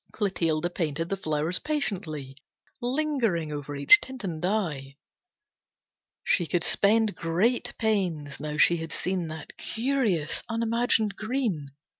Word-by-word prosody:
Clotilde 175 -5 0
painted 165 0 -2
the 195 - 0
flowers 155 -1 -1
patiently, 170 - -3 0.5
Lingering 245 - 0
over 145 -1 -5
each 140 +1 +7
tint 260 -2 -8
and 165 -5 -4
dye. 165 -9 -1 1.3
She 175 -4 +2
could 175 0 +1
spend 215 +3 +3
great 215 +9 0
pains, 175 -10 -1
now 150 0 -4
she 170 +2 +5
had 165 0 -6
seen 180 -2 -2
That 155 -1 -8
curious, 225 - 0
unimagined 230 -2 +1
green. 215 - -2
180 Hz, 120 wpm, -27 LUFS, 155-225 Hz, 1.3 s, each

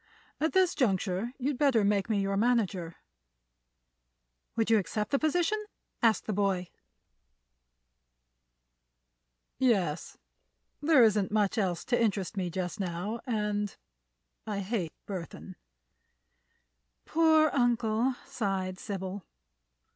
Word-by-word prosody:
At 315 +2 0
this 375 -2 +4
juncture 200 - 0
you'd 270 0 -2
better 265 -7 +4
make 200 0 +1
me 210 -2 +2
your 195 0 0
manager." 200 -7 +1 1.6
"Would 225 0 +1
you 220 - +6
accept 210 +2 -3
the 275 - +2
position?" 355 +7 +1 0.4
asked 225 -2 +3
the 215 - -2
boy. 190 -3 0 2.9
"Yes; 190 - +1 0.6
there 295 -4 +6
isn't 210 -3 +3
much 210 -2 +2
else 180 -5 -1
to 245 -1 +1
interest 205 -3 0
me 185 -3 -1
just 180 +3 -4
now, 190 +5 -3
and—I 205 - -5
hate 190 -5 -2
Burthon." 180 -6 -7 1.5
"Poor 315 -2 +4
uncle!" 240 -1 +2
sighed 195 -8 -2
Sybil. 195 -1 -5
210 Hz, 100 wpm, -30 LUFS, 190-245 Hz, 2.9 s, you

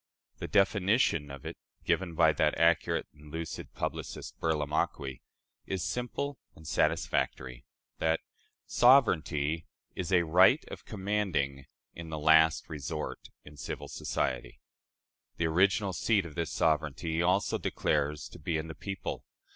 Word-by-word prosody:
The - - -4
definition 100 - +2
of 70 -1 -9
it - - -6 0.3
given 85 -3 0
by - - +5
that - - +1
accurate 85 +1 +2
and 75 0 -15
lucid 80 +1 -6
publicist, - - -5
Burlamaqui, 75 -4 -1 0.5
is 95 -3 -2
simple 125 +8 -3 0.2
and 80 -1 -13
satisfactory 65 -4 0 0.3
that 80 0 +2 0.5
"sovereignty 80 - +3 0.3
is 90 +1 -4
a 90 -2 +5
right 90 - +5
of - - -9
commanding 95 - -1 0.3
in 85 -1 -8
the 80 - -4
last 80 +1 +4
resort 75 +1 -5 0.2
in 75 0 -13
civil - - -6
society." - - -3 0.8
The 85 - 0
original 95 +4 +2
seat 100 +1 +2
of 80 - -9
this 85 0 -3
sovereignty 80 +1 0
he - - +2
also 90 +3 +2
declares 75 0 -1
to - - -13
be 80 - -1
in 80 - -3
the 80 - -7
people. 95 +2 -5
80 Hz, 135 wpm, -30 LUFS, 75-95 Hz, 0.8 s, by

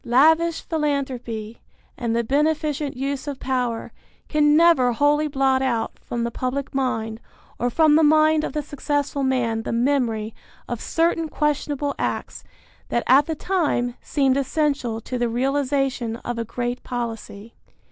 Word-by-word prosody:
Lavish 320 +7 +4
philanthropy 260 -8 -3 0.3
and 235 -3 -2
the 235 - +1
beneficent 295 +1 0
use 275 +2 -3
of 280 -2 -4
power 250 -3 -2 0.4
can 295 -1 +3
never 325 -8 +5
wholly 295 +4 +2
blot 270 -2 +2
out 240 -4 -1
from 240 -1 -4
the 235 - -2
public 260 +3 -3
mind 225 -5 -1 0.4
or 245 - +1
from 310 +4 +4
the 315 - +5
mind 310 0 +4
of - - -3
the 300 -1 -2
successful 290 0 -2
man 245 -4 0
the - - -4
memory 230 -3 0 0.3
of 240 -2 -4
certain 330 -1 0
questionable 290 -1 -1
acts - - -3 0.5
that 235 - 0
at 275 +4 +5
the 320 - -2
time 295 -9 0
seemed 270 -2 +1
essential 275 -4 0
to 250 +3 -4
the 240 -1 +1
realization 270 -1 0
of 240 -1 -3
a 230 - -2
great 245 +2 -3
policy. 230 -3 -6
270 Hz, 145 wpm, -23 LUFS, 240-295 Hz, 0.5 s, never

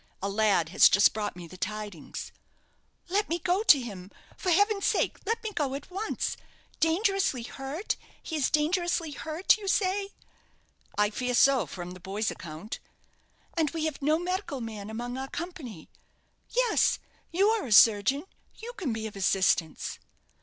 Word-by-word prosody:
A 195 - -2
lad 200 -5 +2
has 180 - +7
just 200 - +5
brought 210 -3 -3
me 175 -1 -9
the 185 +2 -12
tidings." 210 -5 -5 0.8
"Let 405 +4 0
me 335 - +1
go 355 +4 +1
to 395 -10 +7
him 200 -7 -7 0.3
for 370 - -3
heaven's 405 +3 +3
sake, - - +1
let 455 +2 -1
me 440 - -3
go 280 -6 -1
at 285 +5 -8
once! 405 +4 -2 0.4
Dangerously 370 - +1
hurt 275 - -4 0.3
he 320 - -5
is 285 - +2
dangerously 330 +1 +1
hurt, 315 - +1
you 400 - -7
say?" 390 +1 +1 0.9
"I 210 0 +3
fear 250 +2 -1
so, 260 - +5
from 175 +3 -7
the 185 - -10
boy's 200 +4 -2
account." 165 +6 -7 0.7
"And 320 -3 +1
we 320 0 -3
have 310 -2 -3
no 305 +3 +3
medical 360 -4 -3
man 215 -3 -6
among 240 +3 -4
our 265 - -4
company. 295 - -7 0.6
Yes; - - +3 0.3
you 390 +5 +3
are 445 -7 0
a - - -7
surgeon 220 +6 +6 0.3
you 470 +2 -8
can 360 - -3
be 220 0 -4
of 215 - -6
assistance." 190 -4 +1
275 Hz, 160 wpm, -28 LUFS, -, 0.9 s, has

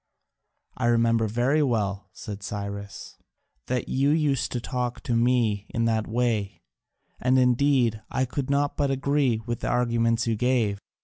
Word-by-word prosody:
"I 125 - -1
remember 115 -1 +3
very 125 +8 +1
well," 100 -7 -1
said 100 +1 -8
Cyrus, 100 0 -6 0.5
"that 125 -1 -1
you 135 +2 +1
used 150 -4 +1
to 125 - -1
talk 125 0 -3
to 120 - -1
me 115 -4 +1
in 115 -1 -1
that 110 -1 0
way: 110 -4 -1 0.6
and 130 +1 +2
indeed 125 -3 +3
I 130 - 0
could 135 +2 -4
not 140 0 +1
but 140 -1 +1
agree 135 -4 +1
with 120 -1 -3
the - - -3
arguments 115 -1 +1
you 115 -1 0
gave. 115 -4 +1
120 Hz, 150 wpm, -26 LUFS, 110-130 Hz, 0.6 s, remember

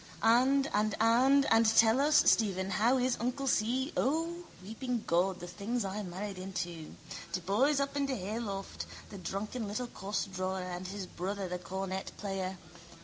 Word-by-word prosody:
And 260 +4 +4
and 210 0 +1
and 255 +5 +5
and 225 0 +6
tell 225 +3 +5
us, 300 +1 +5
Stephen, 195 -3 +1
how 235 +7 +3
is 255 0 +1
uncle 250 +4 -2
Si? 260 +4 +1
O, 330 +5 0 0.2
weeping 235 +3 -3
God, 180 +2 +1
the 175 - -7
things 205 +6 -3
I 195 +2 -3
married 190 +1 -5
into! 175 -4 -5 0.4
De - - 0
boys 240 - +2
up 280 0 -1
in 280 -1 +1
de 265 - -1
hayloft. 200 -1 -4 0.2
The 200 - -8
drunken 210 +5 -4
little 215 +5 -3
costdrawer 190 -3 -3
and 180 0 -5
his 195 0 -5
brother, 190 +2 -4
the 180 0 -4
cornet 190 +1 -4
player. 190 -2 -3
210 Hz, 160 wpm, -32 LUFS, 190-250 Hz, 0.4 s, and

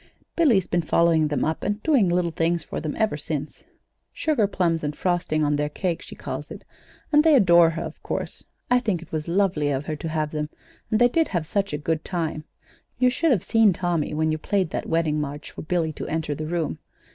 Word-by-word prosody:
Billy's 240 - +4
been 175 - 0
following 165 -1 +3
them 150 - 0
up 160 +1 -2
and 205 +1 -2
doing 265 - +3
little 175 -1 +1
things 165 +1 0
for - - -5
them 155 -1 -4
ever 220 -8 0
since 150 0 -5 0.5
sugarplums 195 - 0
and 150 0 -2
frosting 170 -4 0
on 145 0 +1
their 150 0 -1
cake, 170 +2 -2
she - - -10
calls - - -6
it; - - -9 0.5
and 295 0 +6
they 315 -2 +6
adore 175 -8 +6
her, 165 0 -4
of - - -8
course. - - -4 0.3
I 250 - +6
think 205 -9 -1
it 165 - -18
was 155 0 -3
lovely 175 -5 +1
of 140 0 -1
her 155 - -3
to 160 - -5
have 155 -1 -1
them, 150 -1 -3 0.4
and 215 - +2
they 245 - +6
did 325 +6 +1
have 175 -4 -2
such 200 +4 -1
a 150 - -2
good 155 +1 -2
time! 160 -4 -3 0.5
You 250 +1 +3
should 330 +5 +1
have 230 - +2
seen 225 -4 +4
Tommy 170 -4 -1
when 155 +1 +1
you 155 - -2
played 190 -1 0
that - - -4
wedding 160 -2 +1
march 145 0 -6
for - - -8
Billy 160 -1 -1
to - - -6
enter 155 -2 -2
the 155 +2 -5
room. 170 -1 -2
165 Hz, 220 wpm, -24 LUFS, 155-195 Hz, 0.5 s, and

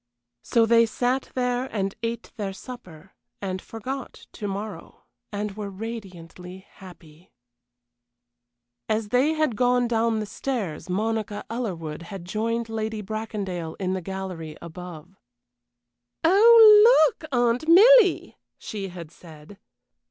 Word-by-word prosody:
So 230 -1 +2
they 230 0 +4
sat 250 +4 -1
there 250 0 0
and 195 -5 -3
ate 230 0 -4
their 200 -4 -4
supper, 190 -7 -12 0.3
and 185 -2 -4
forgot 255 +4 -7
to 210 - -6
morrow, 200 +2 -7 0.3
and 205 -1 -4
were 210 -2 -5
radiantly 190 -3 -9
happy. 170 -2 -16 1.6
As 215 -1 -1
they 260 +7 +2
had 310 -7 0
gone 245 +1 +2
down 230 -1 0
the 215 - -3
stairs 200 - -4
Monica 215 +2 -2
Ellerwood 170 -10 -4
had 175 +1 -9
joined 230 +4 -2
Lady 220 -1 -4
Bracondale 195 -6 -5
in 185 -1 -1
the 190 - -3
gallery 185 -4 -6
above. 175 +1 -10 1.1
"Oh! 430 +1 +8
Look, 315 - -13
Aunt 245 +3 +1
Milly!" 415 +2 +6 0.2
she 200 -2 -6
had 175 -4 -10
said. 165 +3 -15
215 Hz, 120 wpm, -24 LUFS, 185-245 Hz, 1.6 s, Oh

